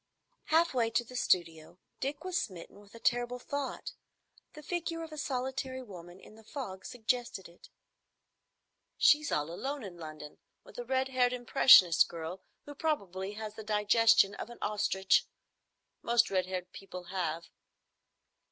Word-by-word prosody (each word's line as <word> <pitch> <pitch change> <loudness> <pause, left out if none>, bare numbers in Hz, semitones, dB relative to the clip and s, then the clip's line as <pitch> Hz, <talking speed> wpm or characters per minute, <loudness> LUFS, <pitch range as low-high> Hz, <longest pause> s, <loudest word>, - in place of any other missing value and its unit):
Half 330 +1 +3
way 235 -3 +2
to 230 +1 +1
the 250 +2 -12
studio, 170 -6 0 0.2
Dick 285 +4 -3
was 370 -1 -4
smitten 185 0 -8
with 205 +2 -18
a - - -10
terrible 245 +1 0
thought. 280 +2 -5 0.6
The 300 - -11
figure 330 0 -3
of 320 - -9
a 305 - -8
solitary 260 -1 -3
woman 180 -4 -11
in - - -15
the 220 +1 -16
fog 215 -7 -7
suggested 240 -4 -2
it. 170 +1 -18 1.3
"She's 300 0 +4
all 150 +2 -1
alone 270 +9 -4
in 185 -4 -8
London, 155 -2 -9 0.2
with - - -12
a 240 - -5
red 260 +1 0
haired 250 -1 +2
impressionist 240 -8 +6
girl, 170 +3 -6 0.2
who 290 - -8
probably 200 - -2
has 215 0 -6
the 220 0 -9
digestion 210 0 +4
of 220 - -7
an 240 - -11
ostrich. 200 -2 +1 0.7
Most 235 0 +2
red 185 -1 +1
haired 180 -1 -5
people 185 -2 -9
have. 170 -3 -3
225 Hz, 150 wpm, -31 LUFS, 185-260 Hz, 1.3 s, impressionist